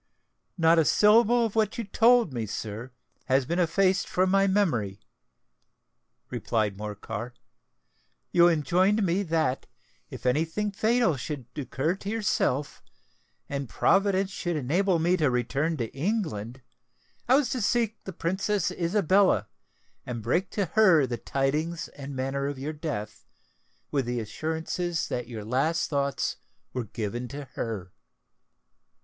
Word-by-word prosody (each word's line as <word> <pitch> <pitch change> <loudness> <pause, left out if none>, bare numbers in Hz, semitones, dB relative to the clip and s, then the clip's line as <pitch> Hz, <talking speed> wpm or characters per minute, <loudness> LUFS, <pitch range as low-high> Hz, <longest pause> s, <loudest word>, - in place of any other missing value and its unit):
"Not 165 0 +5
a - - +5
syllable 230 +5 +5
of 225 - -4
what 215 -2 +1
you 235 - -2
told 230 - +4
me, 115 -3 -3
sir, 110 +4 -5 0.4
has 130 0 +2
been 170 +6 -1
effaced 185 +2 +2
from 185 +1 +1
my 195 0 +4
memory," 125 - +1 1.3
replied 110 -3 -1
Morcar. 105 +3 -6 1.0
"You 175 0 +6
enjoined 180 +6 +2
me 180 +3 +1
that, 160 -7 0 0.4
if - - -10
any 130 +5 +3
thing 205 +6 -3
fatal 220 - +2
should 135 -1 -5
occur 145 +3 -1
to 200 - -6
yourself, 200 - 0 0.7
and 140 -3 -4
Providence 195 - +2
should 175 -3 -3
enable 170 +7 +1
me 175 +3 +2
to 155 -5 +2
return 135 +6 0
to 115 -4 -4
England, 135 - -2 0.7
I 255 - +7
was 280 -2 +2
to 255 - -1
seek 225 +1 0
the 190 - -5
Princess 190 +2 -1
Isabella, 185 +2 +2 0.5
and 120 -3 -5
break 175 - 0
to 200 - 0
her 185 -10 +6
the 120 -2 -3
tidings 150 +7 -1
and 140 -1 -8
manner 135 +1 -2
of 140 -1 -4
your 145 +4 -4
death, 110 -10 -5 0.6
with 135 -4 0
the 120 0 -1
assurance 160 +9 -4 0.3
that 125 - -3
your 110 -4 -7
last 140 +10 0
thoughts 140 -1 -1 0.4
were 125 -2 -3
given 115 +3 -4
to 140 +3 -7
her!" 100 -6 -5
160 Hz, 140 wpm, -27 LUFS, 125-195 Hz, 1.3 s, I